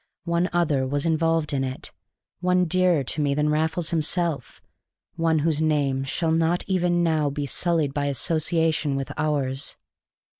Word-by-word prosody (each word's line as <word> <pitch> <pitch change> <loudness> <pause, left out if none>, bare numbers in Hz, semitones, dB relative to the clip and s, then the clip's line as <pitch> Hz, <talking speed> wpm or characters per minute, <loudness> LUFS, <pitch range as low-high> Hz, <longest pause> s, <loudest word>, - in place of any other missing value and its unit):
One 170 +1 +1
other 150 -6 +1
was 145 +3 -1
involved 165 -1 +1
in 135 -1 0
it, 130 0 -4 0.5
one 180 0 +2
dearer 180 -3 +2
to 150 +4 -2
me 140 -1 +1
than 150 +1 +1
Raffles 160 +2 0
himself, 165 -1 -1 0.6
one 165 -1 +1
whose 155 -2 +1
name 140 -4 +1
shall 160 +4 -1
not 165 +2 +1
even 175 -2 +1
now 155 -3 +1
be 145 +1 -3
sullied 160 -1 0
by 145 0 -1
association 160 +1 0
with 135 -2 -3
ours. 140 -3 -1
160 Hz, 150 wpm, -24 LUFS, 145-170 Hz, 0.6 s, one